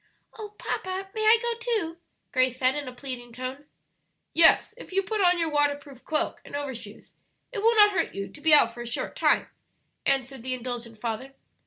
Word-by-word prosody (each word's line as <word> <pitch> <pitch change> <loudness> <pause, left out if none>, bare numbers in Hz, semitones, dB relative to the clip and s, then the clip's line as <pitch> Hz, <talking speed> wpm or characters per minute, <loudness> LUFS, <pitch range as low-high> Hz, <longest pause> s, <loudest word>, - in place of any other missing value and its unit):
"Oh, 420 -2 -9
papa, 380 +1 -4
may 435 - -3
I 440 +2 +7
go 475 0 -1
too?" 440 -9 -1 0.3
Grace 255 -1 +2
said, 255 0 +3
in 290 -1 -4
a - - -5
pleading 250 -2 -6
tone. 255 +4 -6 0.7
"Yes; 335 +6 +6
if - - -12
you 390 +1 +1
put 420 +2 -2
on 360 -1 +4
your 330 -2 0
waterproof 285 -2 -1
cloak 315 +2 -1
and - - -9
overshoes 255 -7 -6 0.4
it 475 - -4
will 455 +3 +4
not 415 -1 +7
hurt 350 -4 -1
you 195 0 -4
to - - -14
be 315 +1 +3
out 235 -6 +6
for 240 - -8
a 240 - -6
short 235 - -3
time," - - +3 0.6
answered 270 -1 0
the 255 +1 -2
indulgent 240 -2 -6
father. 235 +4 -4
285 Hz, 195 wpm, -26 LUFS, 255-380 Hz, 0.7 s, I